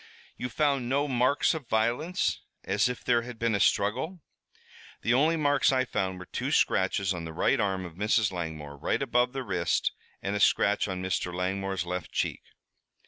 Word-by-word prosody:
"You 125 - -4
found 140 -3 0
no 140 +2 +1
marks 130 +4 +2
of 145 -7 -7
violence, 120 +12 0 0.2
as 100 +4 +1
if 125 - -5
there 120 -1 +3
had 120 0 -8
been 115 0 0
a 100 - +1
struggle?" 130 - +1 0.8
"The 120 - +3
only 155 +6 +3
marks 145 -3 +3
I 130 -1 +2
found 95 -5 -2
were 90 - -9
two - - -3
scratches 95 0 +2
on 85 -2 -5
the 80 - -7
right 80 - +2
arm 95 -3 0
of 85 - -9
Mrs. 105 +2 +1
Langmore, 80 -5 -5
right 75 - -1
above 125 -1 +2
the 135 -1 -3
wrist, 90 -6 0 0.3
and 100 +1 -1
a - - 0
scratch 100 0 +3
on 95 -2 -4
Mr. 90 -1 -1
Langmore's 95 0 -2
left 90 -1 -4
cheek." - - -1
105 Hz, 185 wpm, -28 LUFS, 95-130 Hz, 0.8 s, there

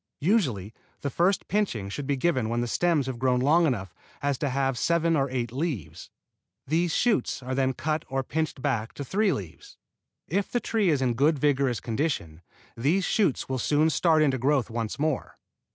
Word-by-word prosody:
Usually 135 - +1 0.3
the 140 - -2
first 180 +8 +1
pinching 190 - -1
should 135 +7 -5
be 140 - +1
given 130 -7 +1
when 120 +1 0
the 120 - -1
stems 165 +1 +1
have 130 -2 -5
grown 125 -1 +2
long 160 +6 +4
enough 100 - -2
so - - -46 0.3
as 140 -2 0
to 145 - 0
have 135 0 0
seven 165 +5 +2
or 135 -2 +1
eight 120 -3 -2
leaves. 135 - -4 0.6
These 165 +4 +1
shoots 210 - +1
are 130 +1 -3
then 130 0 +1
cut 155 +4 -2
or 135 0 -1
pinched 155 -1 -3
back 120 -6 -1
to 140 - -6
three 205 +6 +1
leaves. 95 - -7 0.5
If 195 +5 -1
the 240 - +1
tree 220 -5 +1
is 145 -4 +2
in 125 -2 +2
good 145 +6 +2
vigorous 135 -3 +1
condition, 110 - -2 0.3
these 155 +11 +1
shoots 195 - +1
will 130 -1 -2
soon 155 +5 +2
start 160 +1 +3
into 135 -3 +1
growth 130 -3 +1
once 115 -1 -3
more. 150 -2 -2
140 Hz, 190 wpm, -26 LUFS, 125-160 Hz, 0.6 s, long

